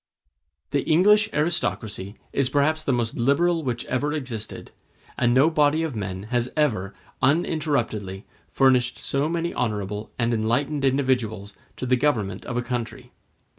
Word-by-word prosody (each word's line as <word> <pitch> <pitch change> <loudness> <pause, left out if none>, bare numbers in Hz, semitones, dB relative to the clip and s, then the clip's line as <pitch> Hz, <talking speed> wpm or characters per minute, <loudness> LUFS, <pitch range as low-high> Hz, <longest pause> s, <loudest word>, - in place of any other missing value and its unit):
The 140 0 +1
English 210 +8 +4
aristocracy 110 - -2 0.2
is 135 -2 +2
perhaps 150 +3 +2
the 140 - 0
most 120 -2 0
liberal 165 +7 +2
which 120 -3 -3
ever 140 +4 -1
existed, 120 -8 -5 0.4
and 120 - +2
no 135 +6 +5
body 150 +1 +3
of 155 -6 -3
men 95 -2 -4
has 120 0 +1
ever, 110 -11 0 0.3
uninterruptedly, 130 - 0 0.2
furnished 125 -2 +3
so 140 +3 -1
many 170 0 -1
honorable 105 -2 -3
and 120 -1 +1
enlightened 120 +6 0
individuals 125 -7 0 0.2
to - - -5
the 125 0 +3
government 110 -9 0
of 120 - -3
a 120 - 0
country. 125 0 -5
130 Hz, 140 wpm, -24 LUFS, 110-150 Hz, 0.4 s, no